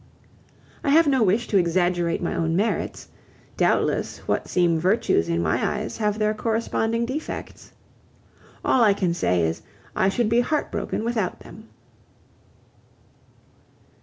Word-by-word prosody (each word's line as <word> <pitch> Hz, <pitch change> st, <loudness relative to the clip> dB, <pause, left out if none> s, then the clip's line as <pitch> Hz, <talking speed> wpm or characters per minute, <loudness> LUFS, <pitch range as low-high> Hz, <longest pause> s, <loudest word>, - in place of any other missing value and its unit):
I -, -, 0 dB
have 325 Hz, +4 st, +6 dB
no 270 Hz, -3 st, +2 dB
wish 215 Hz, +3 st, +2 dB
to 200 Hz, -, +3 dB
exaggerate 175 Hz, 0 st, 0 dB
my -, -, -1 dB
own 165 Hz, 0 st, -1 dB
merits; 205 Hz, +5 st, -2 dB, 0.5 s
doubtless -, -, +1 dB
what -, -, -1 dB
seem 170 Hz, -2 st, +2 dB
virtues 180 Hz, -, +1 dB
in 85 Hz, 0 st, 0 dB
my 80 Hz, 0 st, 0 dB
eyes 210 Hz, +1 st, -2 dB
have 210 Hz, -2 st, 0 dB
their 215 Hz, 0 st, +1 dB
corresponding 225 Hz, +1 st, -1 dB
defects. 275 Hz, +6 st, -6 dB, 0.9 s
All 250 Hz, -, +4 dB
I 205 Hz, -3 st, +4 dB
can 180 Hz, -4 st, 0 dB
say 90 Hz, -, +1 dB
is, 80 Hz, 0 st, -2 dB, 0.3 s
I 190 Hz, -, +2 dB
should 235 Hz, +3 st, 0 dB
be 230 Hz, +2 st, +3 dB
heartbroken 285 Hz, -3 st, -2 dB
without 225 Hz, -6 st, -2 dB
them." 220 Hz, +1 st, -13 dB
210 Hz, 135 wpm, -23 LUFS, 175-230 Hz, 0.9 s, have